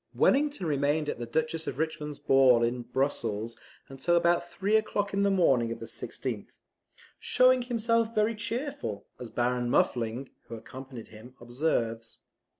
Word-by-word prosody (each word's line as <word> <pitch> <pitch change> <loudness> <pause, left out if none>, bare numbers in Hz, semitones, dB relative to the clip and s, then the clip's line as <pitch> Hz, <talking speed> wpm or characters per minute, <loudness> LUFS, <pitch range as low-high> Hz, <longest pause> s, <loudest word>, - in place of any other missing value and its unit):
Wellington 285 -7 +2
remained 145 0 +1
at - - -4
the 120 - -4
Duchess 160 +5 -1
of - - -3
Richmond's 150 -2 -3
ball 130 -3 +5
at 120 0 -4
Brussels 115 -5 -1 0.4
till 175 +6 +2
about 170 0 +3
three 195 +4 -1
o'clock 205 -2 0
in 200 - +1
the 200 - +3
morning 135 -12 +3
of 115 - -5
the - - -6
16th, - - -6 0.6
"showing 255 0 +4
himself 230 -1 0
very 215 +1 +2
cheerful" 220 - -4
as 125 - -7
Baron 120 +1 0
Muffling, 120 +2 0 0.2
who 115 - -6
accompanied 125 +1 -10
him, 115 +4 -13
observes. 120 -3 -2
145 Hz, 150 wpm, -29 LUFS, 120-200 Hz, 0.6 s, ball